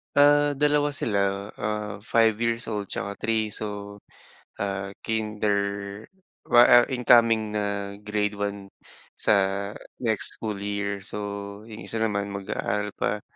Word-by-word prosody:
Ah, 145 0 +5
2 145 +1 +2
sila. 100 -5 0
Ah, 105 0 -3
5 115 -2 +3
years 115 0 -1
old 105 -2 -2
'tsaka 100 +1 -4
3. 110 -1 0
So, 100 -1 -5 0.7
ah, 100 0 -2 0.2
kinder 105 -2 -2 0.4
wa 120 0 +7
ah, 120 0 +7
incoming 115 -4 +4
na 100 -1 -3
grade 105 -1 -2
1 100 -1 -4 0.5
sa - - +3 0.7
next 110 -4 0
school 110 -2 -3
year. 100 0 -3
So, 105 - -4 0.5
yung 110 -1 -9
isa 115 - -4
naman 100 -2 -1
mag-aaral 100 +1 -3
pa. 105 - -1
105 Hz, 125 wpm, -26 LUFS, 100-115 Hz, 0.7 s, wa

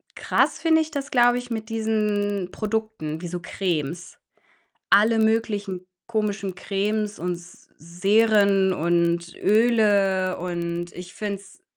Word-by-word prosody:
krass - - +1
finde 320 -1 +3
ich 315 - -4
das, 285 -1 -5
glaube 245 -1 +4
ich, 245 0 -6
mit 220 0 -4
diesen 210 -4 -1
Produkten 215 -8 -3
wie 175 - -5
so 175 +1 -4
Cremes. 170 -3 -3 0.7
Alle 220 +3 +5
möglichen 210 -4 0 0.2
komischen 205 -4 -2
Cremes 205 +2 -2
und 180 +2 -2
S 175 +1 -13
Seren 195 +2 +3
und 170 0 0
Öle 205 -4 +3
und 175 -1 -4
ich 180 0 -10
finde 200 -2 -4
es 280 - -19
200 Hz, 125 wpm, -24 LUFS, 180-220 Hz, 0.7 s, Alle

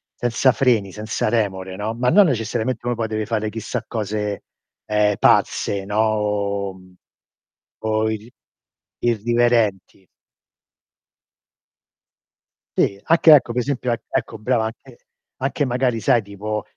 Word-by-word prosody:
senza 120 +2 +2
freni, 115 -7 +2
senza 110 +1 -2
remore, 95 -5 -1
no, 105 +3 -3
ma 125 +1 +1
non 205 +3 +6
necessariamente 115 -1 -2
uno 120 - 0
poi 115 -1 -2
deve 110 0 -3
fare 110 -2 -1
chissà 115 0 -4
cose, 105 -2 -3 0.4
ehm, 105 -1 +2
pazze, 100 -1 +2
no, 105 +1 -3
O 100 -3 -2 0.9
o 110 0 0
irri 110 +2 -7 0.7
irriverenti. 115 -5 +1 2.7
Sì, 100 0 +1
anche 165 -1 +5
ecco 125 -4 +2
per 125 - 0
esempio 125 -2 -2
e 115 - -2
ecco 120 -4 -3
brava, 115 0 +1
anche 120 +2 -9 0.5
anche 145 +2 0
magari 125 -2 0
sai 115 0 +2
tipo 105 +2 -4
110 Hz, 120 wpm, -21 LUFS, 105-120 Hz, 2.7 s, non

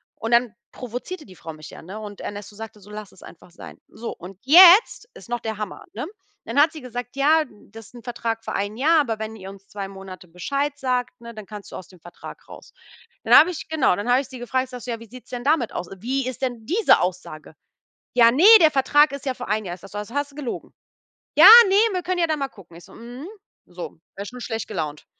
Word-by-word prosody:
Und 225 +1 -5
dann 235 -2 +2 0.2
provozierte 255 - -8
die 185 - -15
Frau 165 -1 -9
mich 155 0 -12
ja, - - -12
ne, 190 +6 -9
und 205 -2 -9
Ernesto 205 0 -8
sagte 220 0 -10
so: 205 - -17
„Lass 210 -1 -9
es - - -20
einfach 175 - -15
sein.“ 170 - -12
So 230 +2 -7
und 185 +2 -12
jetzt 365 - +7
ist - - -14
noch 240 -1 -3
der 220 -1 -5
Hammer, 210 -2 -7
ne? 240 +6 -5 0.4
Dann 235 +5 -1
hat 310 +2 +4
sie 315 - -8
gesagt: 245 0 -8
„Ja, 310 +3 +3 0.3
das 225 -1 -12
ist - - -20
'n 240 - -12
Vertrag 230 -2 -4
für - - -5
1 205 +2 -3
Jahr, 310 +4 +4
aber 225 -6 -3
wenn 220 0 -6
ihr 190 -2 -10
uns 195 0 -14
2 200 -1 -7
Monate 190 -2 -11
Bescheid 275 - -2
sagt, 250 -2 -2
ne, 235 0 -10
dann 215 -2 -10
kannst 205 -1 -11
du - - -9
aus 185 - -12
dem 185 - -18
Vertrag 175 - -12
raus.“ - - -13 0.5
Dann - - +6
habe 355 - +6
ich 345 - -8
genau, 310 - +2
dann 205 +4 -4
habe 250 +2 +4
ich 270 - -12
sie 260 -2 -10
gefragt, 255 +1 -2
sage 250 -1 -9
so: 250 - -5
„Ja, 230 - -5
wie 230 - -12
sieht's 250 +1 -14
denn 245 -1 -5
damit 285 -5 +1
aus? 175 - -5
Wie 260 +5 -2
ist 255 0 -6
denn 240 -4 -4
diese 410 - +3
Aussage?“ 165 -4 -5 0.6
Ja, 235 -1 +6
ne, 290 +8 +2 0.2
der 315 -2 +5
Vertrag 290 +2 +3
ist 280 0 -8
ja 260 - -1
für 245 - -8
1 215 +1 -1
Jahr. 175 -2 -6
Ich - - -24
sage 195 - -13
so: 205 - -6
„Also 210 +4 -8
hast 285 0 -2
du - - -20
gelogen.“ 280 -5 -6 0.6
Ja, 320 +4 +8 0.2
ne, 385 - +2 0.2
wir 365 - -2
können 365 0 -2
ja 335 - +3
dann 310 -2 -1
mal 275 - -2
gucken. 180 -9 -17
Ich 175 - -14
so: - - -17
„Mhm.“ 245 +7 -10 0.4
So, 175 0 -8 0.3
war 200 - -6
ich - - -9
schon 250 0 -10
schlecht 225 -2 -5
gelaunt. 155 -7 -5
235 Hz, 255 wpm, -22 LUFS, 205-275 Hz, 0.6 s, Ja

